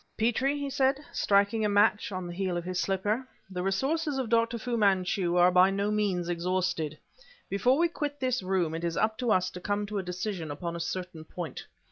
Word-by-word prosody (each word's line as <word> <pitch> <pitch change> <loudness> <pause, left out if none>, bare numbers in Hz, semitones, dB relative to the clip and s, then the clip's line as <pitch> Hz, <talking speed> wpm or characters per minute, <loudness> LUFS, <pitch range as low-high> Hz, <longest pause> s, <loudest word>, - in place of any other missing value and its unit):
"Petrie," 245 +5 +1
he 285 0 -3
said, 270 +1 +2
striking 200 +2 +2
a 210 - +2
match 205 +2 +3
on 185 -1 -4
the 175 - -6
heel 185 -1 -1
of 175 - -3
his 185 0 -2
slipper, 205 +6 0 0.3
"the 180 -1 -3
resources 275 - 0
of 260 -4 -2
Dr. 230 0 +2
Fu 240 +1 -3
Manchu 190 -4 +2
are 180 +1 +6
by 180 +1 +6
no 200 +1 0
means 200 -5 0
exhausted. 175 -3 -1 0.5
Before 245 +7 +3
we 340 +2 +4
quit 290 -3 -4
this 255 -3 0
room 185 -4 0
it 165 +1 -4
is 170 -1 -1
up 220 0 +1
to 245 -3 +1
us 185 -2 +2
to 180 - -9
come 205 +2 -1
to 205 0 -3
a - - -3
decision 180 -2 -4
upon 170 +4 -4
a - - -4
certain 175 -2 -4
point." 170 0 -7
195 Hz, 210 wpm, -29 LUFS, 180-230 Hz, 0.5 s, are